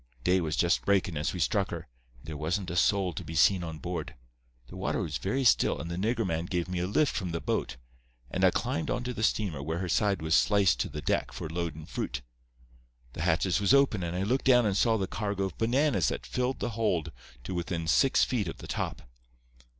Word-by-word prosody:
"Day 90 +5 +3
was 80 -2 -1
just 85 +3 +2
breakin' 95 -4 +1
as 75 +1 -1
we 90 - -5
struck 70 -7 +1
her, - - -6 0.3
and - - -20
there 80 - -6
wasn't 85 +5 -2
a - - -4
soul 95 0 +2
to - - -6
be 80 - -7
seen 90 +3 +4
on 80 -2 -5
board. 75 - -5 0.5
The - - -12
water - - -1
was 70 -5 -3
very 135 - -1
still, 120 - +3
and 85 - -5
the - - -2
nigger 115 +5 0
man 85 -2 -1
gave 85 -1 -2
me 90 -1 -3
a 90 - -1
lift 140 +9 +1
from 90 - -2
the 85 0 -2
boat, - - -2 0.5
and - - -1
I - - +7
climbed 80 - -2
onto 125 0 -2
the 110 - -5
steamer 100 -9 0
where 80 +4 -3
her 90 +1 -3
side 100 0 +1
was 80 0 0
sliced 95 - +4
to - - -1
the - - -7
deck - - 0
for - - -6
loadin' 80 -2 -4
fruit. 60 -4 -4 0.9
The - - -6
hatches 85 +3 +1
was 105 +7 +5
open, 135 -8 +3
and 85 0 -3
I 95 - 0
looked 125 +7 0
down 125 -3 +5
and 100 -2 +1
saw 115 +2 +3
the 95 - -1
cargo 100 0 -2
of 95 -4 -4
bananas 120 - +2
that - - -3
filled 125 +1 -2
the 120 - -1
hold 105 -8 0 0.3
to 95 - -5
within 85 -2 -3
six 135 - +4
feet 115 -7 0
of 80 - -5
the - - -10
top. - - -4
90 Hz, 230 wpm, -29 LUFS, 80-105 Hz, 0.9 s, I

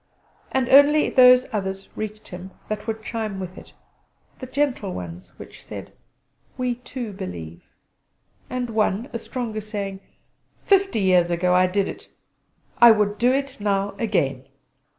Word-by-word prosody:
And 265 -2 +1
only 290 +2 +6
those 250 0 +7
others 195 -2 -3
reached 215 0 -6
him 180 +1 -8 0.2
that 215 0 -4
would 220 0 -3
chime 215 -4 -4
with 185 -1 -6
it; - - -13 0.7
the 255 - -7
gentle 260 -8 -1
ones 90 0 -8
which - - -12
said: - - -9 0.6
"We 250 -1 0
too 245 -2 -7
believe," 85 - -7 0.9
and 250 -2 -3
one, 220 +3 0
a 230 - -3
stronger, 225 -2 -4
saying: 200 -2 -5 0.7
"Fifty 390 - +3
years 180 -2 +4
ago 175 +1 +1
I 185 0 +5
did 195 +2 0
it. - - -8 0.7
I 235 - +10
would 210 -2 +3
do 245 +2 +4
it 275 0 -2
now 200 -1 0
again!" 140 - -1
215 Hz, 145 wpm, -23 LUFS, 190-250 Hz, 0.9 s, I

